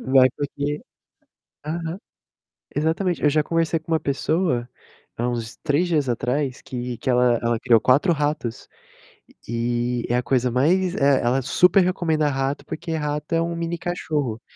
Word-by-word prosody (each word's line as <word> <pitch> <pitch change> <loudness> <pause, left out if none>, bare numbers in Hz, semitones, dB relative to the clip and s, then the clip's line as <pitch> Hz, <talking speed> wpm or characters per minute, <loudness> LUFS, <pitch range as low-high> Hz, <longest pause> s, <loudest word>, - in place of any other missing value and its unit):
Vai 130 -1 +7
porque 145 +1 -3 0.9
aham. 165 +2 -3 0.8
Exatamente, 165 +4 0
eu 150 - +4
já 155 +1 +2
conversei 165 +1 0
com 160 - -12
uma 160 - +4
pessoa 140 -3 0 0.5
há 120 - -1
uns 115 -2 -4
3 160 +3 +2
dias 150 -6 +1
atrás 125 +3 -1
que 125 -1 -5
que - - -1
ela 125 -1 +3
ela 115 -1 +1
criou 120 -2 +4
4 140 - +4
ratos 145 -6 -2 0.8
e 120 +1 -1
é 120 - +1
a 125 - +1
coisa 125 -1 +1
mais 175 +9 +2
é, 140 -4 +3
ela 125 +3 +1
super 180 +8 +4
recomenda 160 -4 +1
rato, 135 0 -2
porque 165 +1 -6
rato 150 +1 -2
é 165 - +3
um 170 0 -2
mini 170 0 -2
cachorro. 150 -9 -2
145 Hz, 155 wpm, -23 LUFS, 125-165 Hz, 0.9 s, Vai